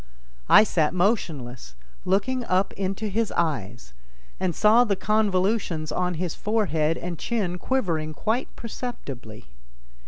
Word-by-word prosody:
I - - +9
sat 170 -5 +1
motionless, 145 - -1 0.3
looking 225 +7 +1
up 190 0 +1
into 195 +2 -3
his 215 +1 -1
eyes, 120 - -2 0.5
and 180 -3 -1
saw 220 +3 +6
the 210 -5 +1
convolutions 190 -5 0
on 180 +2 -1
his 175 0 -2
forehead 165 -8 0
and 175 -2 -5
chin 190 -7 -2
quivering 165 -13 -1
quite 225 +4 -1
perceptibly. 140 - -7
185 Hz, 120 wpm, -25 LUFS, 155-215 Hz, 0.5 s, I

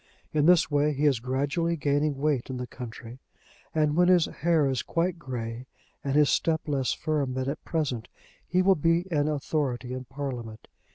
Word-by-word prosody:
In 150 0 +3
this 170 -4 +5
way 145 +1 +2
he 145 +2 0
is 135 -5 +3
gradually 140 +7 -1
gaining 145 0 +1
weight 140 -3 0
in 130 - -4
the 125 - -4
country, 120 0 -9 0.5
and 150 -1 +1
when 175 +1 +4
his 180 -2 +5
hair 165 -4 +1
is 130 -2 0
quite 170 +1 -1
grey 120 -3 -5 0.4
and 140 0 -1
his 150 -1 +5
step 160 -1 +1
less 135 -3 0
firm 145 -5 -1
than 130 0 -2
at 140 +3 -4
present, 135 -9 -2 0.4
he 180 +1 +2
will 195 +1 +6
be 165 +1 +2
an 150 -2 +2
authority 140 -4 -2
in 130 0 -5
Parliament. 125 -5 -6
145 Hz, 180 wpm, -27 LUFS, 130-160 Hz, 0.5 s, will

